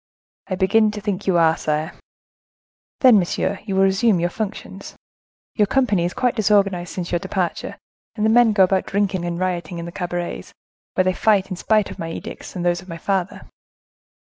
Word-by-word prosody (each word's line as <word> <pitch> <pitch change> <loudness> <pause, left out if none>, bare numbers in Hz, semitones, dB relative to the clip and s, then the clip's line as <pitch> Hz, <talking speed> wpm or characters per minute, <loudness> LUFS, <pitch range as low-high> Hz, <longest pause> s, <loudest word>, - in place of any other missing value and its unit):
"I 185 - -2
begin 205 +4 +3
to 210 - -5
think 200 -3 -4
you 185 -2 +3
are, 165 -1 +4
sire." 155 +2 -2 1.1
"Then, 250 -6 +7
monsieur, 175 - -1
you 195 -3 -3
will 190 - +4
resume 195 +1 +3
your 175 +1 0
functions. 215 0 -6 0.6
Your 210 -2 +2
company 210 -8 +1
is 175 - -3
quite 250 -2 +1
disorganized 195 -5 +1
since 175 -2 -4
your 175 - +1
departure, 190 -2 -3 0.4
and 215 -2 -1
the 220 - +4
men 240 -1 +5
go 195 -2 +5
about 190 0 +1
drinking 195 -3 -1
and 170 -1 -3
rioting 180 -2 -2
in 170 - -5
the 170 - -7
cabarets, 175 -1 -5 0.4
where 185 - +3
they 185 0 +1
fight, 195 -1 +2
in - - -2
spite 215 +2 +1
of - - -10
my 165 - -4
edicts, 165 - -8
and 175 -1 -3
those 175 0 +1
of 185 - -16
my 165 - -6
father. 190 +1 -2
190 Hz, 195 wpm, -21 LUFS, 175-210 Hz, 1.1 s, Then